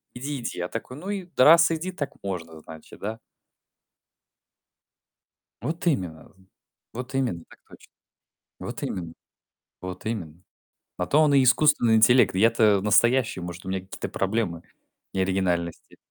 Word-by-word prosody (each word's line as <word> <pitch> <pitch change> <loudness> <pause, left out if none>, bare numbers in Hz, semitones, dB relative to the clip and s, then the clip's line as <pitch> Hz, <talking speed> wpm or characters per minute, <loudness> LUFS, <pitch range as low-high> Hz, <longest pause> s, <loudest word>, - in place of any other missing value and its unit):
Иди, 140 +2 -4
иди". - - -5
Я 90 - -2
такой: 125 +3 -7
"Ну 185 +6 -7
и, 200 -2 -3
да, 130 - +5
раз 170 +2 +7
иди, 165 +3 -3
так 145 -6 -4
можно, 85 -5 -5
значит, 80 0 -13
да?" 110 +2 -5 2.4
Вот 165 +7 -4
именно. 90 - -2 0.6
Вот 125 +3 -7
именно, 120 -11 -1
так - - -17
точно. - - -17 0.7
Вот - - -7
именно. 85 -3 -4 0.7
Вот 90 0 -7
именно. 90 -8 -5 0.6
На 90 - -1
то 150 - +2
он 150 -2 +4
и 135 - +6
искусственный 125 -3 +4
интеллект. 115 0 +5
Я-то 110 0 +4
настоящий. 110 +1 +2
Может, 90 +1 -8
у 95 - -7
меня 95 0 -2
какие-то 95 +1 -7
проблемы 95 -4 -2 0.5
неоригинальности. 95 -3 -2
110 Hz, 140 wpm, -25 LUFS, 90-135 Hz, 2.4 s, раз